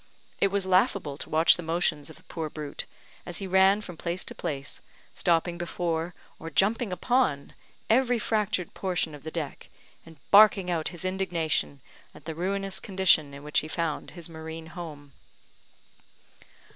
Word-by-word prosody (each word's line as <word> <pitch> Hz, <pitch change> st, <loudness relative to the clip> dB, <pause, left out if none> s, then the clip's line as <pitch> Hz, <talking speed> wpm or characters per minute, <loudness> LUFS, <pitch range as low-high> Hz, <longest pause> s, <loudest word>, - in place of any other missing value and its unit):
It -, -, +4 dB
was 195 Hz, -1 st, 0 dB
laughable 190 Hz, -, +2 dB
to -, -, -7 dB
watch 160 Hz, +1 st, +5 dB
the -, -, -5 dB
motions 165 Hz, -2 st, 0 dB
of 160 Hz, -, -11 dB
the -, -, -19 dB
poor 160 Hz, -2 st, -5 dB
brute, 150 Hz, -1 st, -6 dB, 0.4 s
as 175 Hz, -, -4 dB
he 195 Hz, -, -4 dB
ran 190 Hz, +2 st, +5 dB
from 180 Hz, -5 st, -9 dB
place 175 Hz, +3 st, -2 dB
to -, -, -9 dB
place, 140 Hz, -1 st, -5 dB, 0.3 s
stopping 170 Hz, 0 st, +1 dB
before, 170 Hz, -1 st, -2 dB, 0.2 s
or 165 Hz, -, -6 dB
jumping 210 Hz, +4 st, +2 dB
upon, 210 Hz, -, +1 dB, 0.3 s
every 245 Hz, +1 st, +3 dB
fractured 210 Hz, -5 st, -1 dB
portion 180 Hz, -4 st, -1 dB
of 145 Hz, -, -10 dB
the 160 Hz, -, -6 dB
deck, 155 Hz, -4 st, -5 dB, 0.3 s
and 165 Hz, -1 st, -15 dB
barking 200 Hz, -3 st, +7 dB
out 165 Hz, -2 st, 0 dB
his 175 Hz, 0 st, -4 dB
indignation 170 Hz, -7 st, -1 dB, 0.3 s
at 150 Hz, -, -14 dB
the 160 Hz, -, -4 dB
ruinous 195 Hz, +3 st, -1 dB
condition 185 Hz, -7 st, +3 dB
in 140 Hz, +1 st, -10 dB
which 150 Hz, 0 st, +2 dB
he 155 Hz, -, -5 dB
found 160 Hz, -1 st, -2 dB
his 170 Hz, -, -5 dB
marine 160 Hz, 0 st, -8 dB
home. 150 Hz, -5 st, -8 dB
170 Hz, 160 wpm, -28 LUFS, 160-190 Hz, 0.4 s, barking